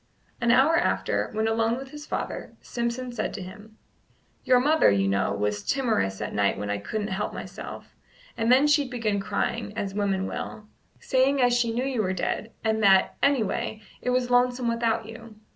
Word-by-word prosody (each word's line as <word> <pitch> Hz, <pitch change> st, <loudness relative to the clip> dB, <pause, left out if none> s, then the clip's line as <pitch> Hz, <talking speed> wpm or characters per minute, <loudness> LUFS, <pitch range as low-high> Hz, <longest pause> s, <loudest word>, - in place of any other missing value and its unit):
An 235 Hz, -, +1 dB
hour 275 Hz, +7 st, +5 dB
after, 345 Hz, -, 0 dB
when 220 Hz, +1 st, 0 dB
alone 225 Hz, +1 st, +1 dB
with 270 Hz, 0 st, -8 dB
his 300 Hz, 0 st, -9 dB
father, -, -, -4 dB
Simpson 240 Hz, +1 st, -3 dB
said 225 Hz, -3 st, -3 dB
to 205 Hz, -, -5 dB
him: 210 Hz, +4 st, -12 dB, 0.7 s
"Your 250 Hz, -1 st, +5 dB
mother, 305 Hz, +5 st, +4 dB
you 100 Hz, -1 st, +2 dB
know, 95 Hz, 0 st, +1 dB
was 105 Hz, 0 st, -1 dB
timorous 220 Hz, -, 0 dB
at -, -, -4 dB
night 100 Hz, -1 st, +1 dB
when 105 Hz, 0 st, -3 dB
I 100 Hz, -, -1 dB
couldn't 210 Hz, -, -3 dB
help 190 Hz, +2 st, -3 dB
myself; -, -, -8 dB, 0.4 s
and 230 Hz, +1 st, +1 dB
then 265 Hz, +3 st, +6 dB
she'd 295 Hz, -2 st, +3 dB
begin 225 Hz, -5 st, -1 dB
crying, 210 Hz, +2 st, -2 dB
as 195 Hz, -3 st, -3 dB
women 195 Hz, -2 st, 0 dB
will, 215 Hz, -, -6 dB, 0.3 s
saying 270 Hz, +2 st, +2 dB
as 245 Hz, -1 st, +4 dB
she 240 Hz, -1 st, +1 dB
knew 245 Hz, +3 st, -1 dB
you 260 Hz, -4 st, 0 dB
were 190 Hz, -2 st, -1 dB
dead, 210 Hz, +4 st, -2 dB
and 220 Hz, -1 st, +1 dB
that, 195 Hz, -2 st, +5 dB
any 275 Hz, -4 st, +3 dB
way, 215 Hz, +1 st, -3 dB, 0.2 s
it 250 Hz, -, -2 dB
was 250 Hz, 0 st, +1 dB
lonesome 245 Hz, 0 st, +2 dB
without 230 Hz, -1 st, 0 dB
you. 225 Hz, 0 st, -11 dB
225 Hz, 190 wpm, -26 LUFS, 200-250 Hz, 0.7 s, then